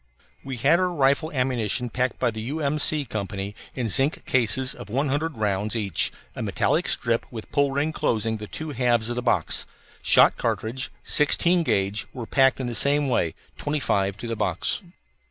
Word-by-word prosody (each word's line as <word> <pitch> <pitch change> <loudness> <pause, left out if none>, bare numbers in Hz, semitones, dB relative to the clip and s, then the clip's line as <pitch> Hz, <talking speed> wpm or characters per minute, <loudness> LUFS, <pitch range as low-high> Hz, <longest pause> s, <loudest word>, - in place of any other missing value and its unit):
We 135 -2 -5
had 145 +9 +3
our 185 -1 +1
rifle 145 -1 +1
ammunition 125 -3 0
packed 125 +2 -1
by 125 -2 +1
the 110 0 -6
U. 140 +8 -4
M. 150 0 0
C. 150 0 +2
Co. 105 -5 -4 0.5
in 125 -3 -2
zinc 135 +7 +1
cases 130 +2 +2
of - - -11
one 135 +6 0
hundred 150 +1 -2
rounds 105 +1 -1
each, 100 -6 +2 0.2
a - - -5
metallic - - 0
strip 115 0 +1
with 115 -3 -9
pull 140 -1 +2
ring 145 +3 0
closing 115 -7 0
the 105 0 -8
two 155 +8 -5
halves 120 -3 +1
of - - -3
the 125 - -2
box. 120 - 0 0.3
Shot - - +5
cartridge, 125 +4 -2
sixteen 170 +4 +3
gauge, 100 -8 0
were 120 -3 -6
packed 135 +2 +3
the 125 -2 -3
same 140 +3 +3
way, 85 -10 0 0.2
twenty 150 +1 -1
five 100 -6 0
to 120 - -6
the 115 - -2
box. 90 - -2
125 Hz, 185 wpm, -24 LUFS, 110-145 Hz, 0.5 s, Shot